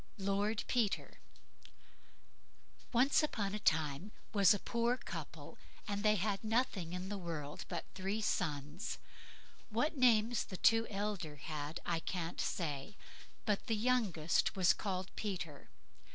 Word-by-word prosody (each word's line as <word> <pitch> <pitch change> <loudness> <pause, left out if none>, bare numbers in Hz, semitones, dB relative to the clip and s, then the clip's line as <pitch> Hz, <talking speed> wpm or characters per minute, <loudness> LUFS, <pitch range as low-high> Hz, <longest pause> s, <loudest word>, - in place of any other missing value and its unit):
LORD 200 +2 0
PETER 230 -5 0 1.7
Once 260 +6 +4
on 200 -2 0
a 210 - -2
time 155 -6 +2
there - - -22 0.2
was 200 -3 +6
a 205 - +5
poor 235 +3 +1
couple, - - -7 0.3
and 205 -1 -1
they 215 0 +4
had 200 +1 0
nothing 215 -6 0
in 180 +1 -4
the 205 -1 -3
world 155 -5 -5
but 170 -2 -3
three 195 +3 -2
sons. 155 -4 -1 0.7
What 240 +8 +1
the 285 - -8
names 235 -2 +4
the 185 - -7
two 225 +3 +4
elder 200 -6 -3
had 150 +1 -5
I 170 -1 +1
can't 170 0 -3
say, 155 +3 -2 0.5
but 210 0 0
the 225 - +2
youngest 210 -9 +2
he - - -17
was 185 -3 +5
called 190 -2 -3
Peter. 175 -8 -4
200 Hz, 140 wpm, -36 LUFS, 170-220 Hz, 1.7 s, was